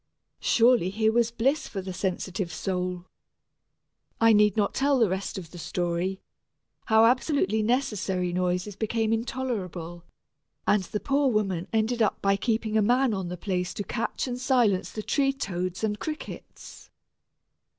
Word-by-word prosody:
Surely 235 -5 +4
here 220 +2 +1
was 235 0 +2
bliss 270 +7 0
for 200 - -5
the 190 0 -5
sensitive 185 0 -3
soul. 180 +1 -3 1.1
I 225 0 +6
need 210 -1 +4
not 205 -2 +1
tell 280 0 +2
the 230 -3 +4
rest 190 +2 -3
of 170 -4 -8
the 175 - -10
story, 175 +3 -2 0.7
how 220 0 +5
absolutely 230 - +2
necessary 210 -7 0
noises 180 +2 -1
became 220 +1 0
intolerable, 200 -9 -4 0.6
and 205 - +3
the 210 - -3
poor 280 +2 +2
woman 195 -6 0
ended 225 +2 0 0.2
by 195 0 +2
keeping 220 +1 -1
a - - +4
man 245 +3 +3
on 190 -3 -3
the 180 +1 -5
place 180 -1 -2
to 205 - -3
catch 230 +2 -3
and 250 0 -4
silence 235 -8 +2
the 215 - -5
tree 275 +3 +2
toads 185 -7 -4
and 210 -1 -1
crickets. 305 +3 -8
210 Hz, 150 wpm, -27 LUFS, 185-235 Hz, 1.1 s, I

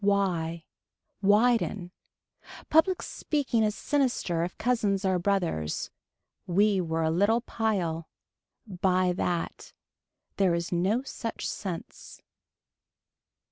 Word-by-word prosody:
Why. 175 -5 +1 0.6
Widen. 205 -3 +2 0.8
Public 355 +4 +4
speaking 275 -7 -1
is 210 -1 +1
sinister 245 - 0
if 175 - -5
cousins 210 -5 +1
are 185 -1 +2
brothers. 175 - -1 0.6
We 200 +2 +3
were 165 -1 -1
a 160 - +2
little 205 +7 +3
pile. 185 -9 -2 0.6
Buy 185 -2 +1
that. 175 -1 -3 0.6
There 185 -3 +3
is 170 0 -3
no 190 +8 +1
such 230 -4 -5
sense. 180 -5 -6
195 Hz, 100 wpm, -28 LUFS, 175-220 Hz, 0.8 s, Public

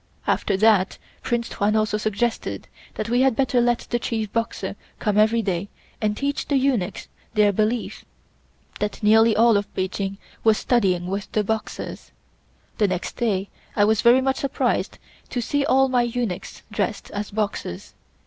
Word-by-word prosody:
After 195 - +1
that 210 -2 +3 0.2
Prince 235 -1 -1
Tuan 210 +1 0
also 215 -1 +1
suggested 215 +2 -2 0.3
that 215 - -3
we 240 +2 +2
had 265 -3 +3
better 255 -1 +2
let 240 0 +2
the 240 - +1
chief 220 -3 -3
Boxer 230 0 -2 0.2
come 210 -3 0
every 220 +2 +4
day 190 0 -2 0.3
and 210 -1 0
teach 280 0 -2
the 285 - +1
eunuchs 255 -9 0 0.3
their 210 -1 +5
belief; 220 +4 -1 0.8
that 210 +1 -3
nearly 220 +1 +5
all 230 -1 +5
of 200 - -3
Peking 195 +1 -2 0.3
was 220 -1 +5
studying 190 -8 +1
with 195 +2 -4
the 215 - +2
Boxers. 220 +1 -4 0.7
The 210 - +4
next 185 -2 -3
day 200 -5 0 0.3
I 205 - +4
was 220 0 +2
very 245 +2 +6
much 265 0 0
surprised 275 - -1 0.3
to 245 - -2
see 280 +4 0
all 270 -2 +4
my 255 -2 +2
eunuchs 240 -6 -3
dressed - - -2
as 205 0 -4
Boxers. 205 - -4
220 Hz, 160 wpm, -23 LUFS, 205-240 Hz, 0.8 s, very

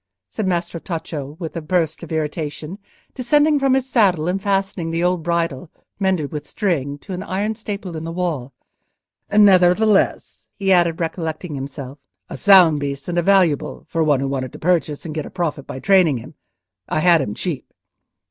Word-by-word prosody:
said 205 - -3
Maestro 170 -1 -2
Tacco, 155 -4 -6
with 165 -2 -6
a 165 - -3
burst 160 -1 -1
of 170 - -9
irritation, 155 +3 -4 0.3
descending 295 +4 +3
from 270 -1 +3
his 265 -1 0
saddle 190 -11 +2
and 190 +2 -1
fastening 195 -4 -1
the 165 +1 -1
old 180 -1 +1
bridle, 170 -2 -2 0.3
mended 185 -7 0
with 150 -1 -6
string, 145 -8 -1
to 185 - -9
an 180 - -4
iron 200 +3 -2
staple 200 -5 -6
in 160 - -5
the 165 - -5
wall. 165 -7 -3 0.8
"Nevertheless," 200 0 +3
he 195 -1 +2
added, 170 -2 +2
recollecting 160 0 -3
himself, 140 0 -7 0.3
"a - - -4
sound 180 -7 +6
beast 140 -1 -4
and 175 0 0
a - - +3
valuable, 180 -5 +2
for 165 -1 0
one 145 -4 +2
who 135 - -1
wanted 130 -2 -3
to - - -8
purchase, 160 -4 0
and 155 - -5
get 155 -1 -4
a - - -9
profit 165 -6 -3
by 130 - -6
training 180 -3 +4
him. 115 - -10 0.6
I 155 - 0
had 170 -2 +5
him 105 -6 -4
cheap." 170 -8 -5
170 Hz, 180 wpm, -20 LUFS, 150-190 Hz, 0.8 s, sound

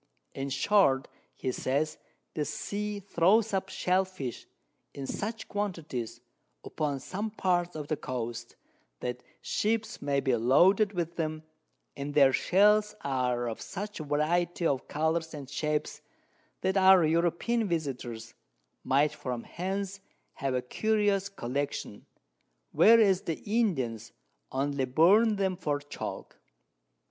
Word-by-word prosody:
In 135 0 -4
short, 140 -1 +3 0.3
he 130 - -2
says, 145 +5 -1 0.3
the 150 - -1
Sea 205 +6 -4
throws 200 +3 +2
up 190 0 -1
Shell 185 +1 +1
fish, 145 -10 -7 0.5
in 140 - -5
such 220 +9 -4
Quantities, 165 - -4 0.4
upon 145 -3 -2
some 200 +10 -4
Parts 175 -4 0
of 150 -2 -5
the 155 - 0
Coast, 120 -3 -5 0.5
that 125 0 -3 0.2
Ships 225 +1 -1
may 140 -1 +1
be 130 -2 +1
loaded 180 - +4
with 170 -2 -3
them, 155 -1 -2 0.5
and 140 +1 -5
their 135 -3 +6
Shells 210 +5 +4
are 125 -3 0
of 115 - -5
such 205 +1 -6
Variety 165 +4 0
of 135 -5 0
Colours 160 +1 -1
and 140 -3 -8
Shapes, 150 +2 -2 0.6
that 190 +1 +1
our 190 -2 +7
European 175 +8 +1
Virtusos 125 -8 -4 0.5
might 145 +3 +2
from 125 -3 -5
hence 195 +2 -4 0.3
have 135 -1 -2
a 125 - -1
curious 205 +4 +1
Collection, 140 - -4 0.6
whereas 215 -4 +6
the 165 - -2
Indians 145 - -1 0.4
only 135 0 0
burn 195 - +5
them 190 -2 0
for 150 -5 -1
Chalk. 145 0 -7
160 Hz, 125 wpm, -29 LUFS, 135-195 Hz, 0.6 s, our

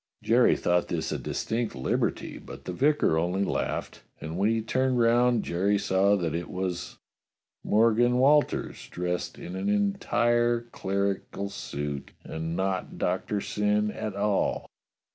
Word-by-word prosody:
Jerry - - +4
thought 90 0 +1
this - - -2
a - - -2
distinct 115 0 -2
liberty, 65 - -1
but - - -11
the 90 - -4
vicar 135 - +2
only 90 +4 0
laughed, - - -2 0.2
and 80 +1 -6
when 100 +4 +2
he 115 0 +1
turned 130 +3 0
round 120 0 +3
Jerry 100 +4 +1
saw 100 +1 +3
that 85 -5 -1
it 85 +1 -3
was 90 -2 -4 0.7
Morgan 115 +3 +3
Walters 145 +3 +2
dressed 90 0 -3
in 90 - -7
an 95 - -2
entire 120 - +2
clerical 100 0 -2
suit, 70 -4 -5
and 80 +1 -4
not 95 0 -2
Doctor 105 -1 -1
Syn 105 +1 0
at 105 -1 -5
all. 100 0 0
100 Hz, 140 wpm, -27 LUFS, 90-120 Hz, 0.7 s, Jerry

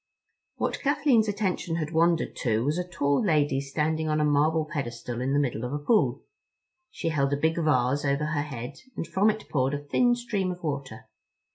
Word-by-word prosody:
What - - -2
Kathleen's 270 -6 +3
attention 195 -5 -1
had 160 -1 -3
wandered 165 0 +2
to 115 -1 0
was 150 +5 0
a - - 0
tall 145 -3 +1
lady 145 -7 +2
standing 155 +3 -1
on 155 0 +1
a 150 - +2
marble 155 +2 +2
pedestal 120 -5 -4
in 130 +1 -1
the 140 - +2
middle 125 -5 0
of 125 +2 -3
a - - 0
pool. 210 +9 +1 0.7
She 165 - -3
held 140 -3 +1
a - - +1
big 160 +3 +1
vase 145 -4 +2
over 140 +1 +1
her 150 -1 -1
head, 135 -2 -6 0.2
and - - -2
from 190 +6 +2
it 215 0 -3
poured 135 0 0
a 145 0 -7
thin 245 - +3
stream 210 -6 -2
of 180 0 -8
water. 140 -7 -4
150 Hz, 195 wpm, -27 LUFS, 140-170 Hz, 0.7 s, Kathleen's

